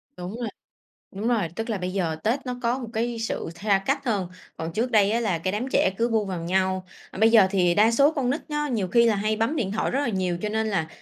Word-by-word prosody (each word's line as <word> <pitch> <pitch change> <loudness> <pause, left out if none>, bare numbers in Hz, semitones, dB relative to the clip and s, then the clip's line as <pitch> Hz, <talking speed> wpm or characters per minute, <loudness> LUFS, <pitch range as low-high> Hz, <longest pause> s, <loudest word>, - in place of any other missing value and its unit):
Đúng 180 +5 -6
rồi. 235 - -2 0.6
Đúng 205 +4 -3
rồi, 215 -8 +1
tức 225 +1 -3
là 210 - -1
bây 180 0 -3
giờ 170 -5 -1
Tết 255 +5 -1
nó 250 - -3
có 235 +2 +1
một 245 -3 -6
cái 235 +1 -2
sự 225 -6 -3
tha 200 +2 +2
cách - - 0
hơn, 200 -6 0 0.3
còn 160 0 -5
trước 235 +4 -1
đây 210 -3 +4
á 235 - +1
là 195 -7 0
cái 185 +3 -2
đám 215 +5 -2
trẻ - - +3
cứ 235 +1 +2
bu 220 -2 +1
vào 185 -3 -4
nhau. 185 +1 0 0.3
Ờ, - - -10
bây 220 +2 +5
giờ 220 -4 +7
thì 180 -3 +2
đa 215 +2 +5
số 280 +6 +4
con 270 -5 -1
nít 290 +5 -1
nó 295 0 -1
nhiều 220 -9 -1
khi 235 +5 +4
là 225 - +3
hay 215 +2 0
bấm 225 +8 0
điện 200 -8 -1
thoại 220 - -1
rất 270 - 0
là 285 - 0
nhiều 185 -4 -1
cho 210 - -1
nên 220 +1 -1
là 195 -7 -1
215 Hz, 280 wpm, -25 LUFS, 190-235 Hz, 0.6 s, giờ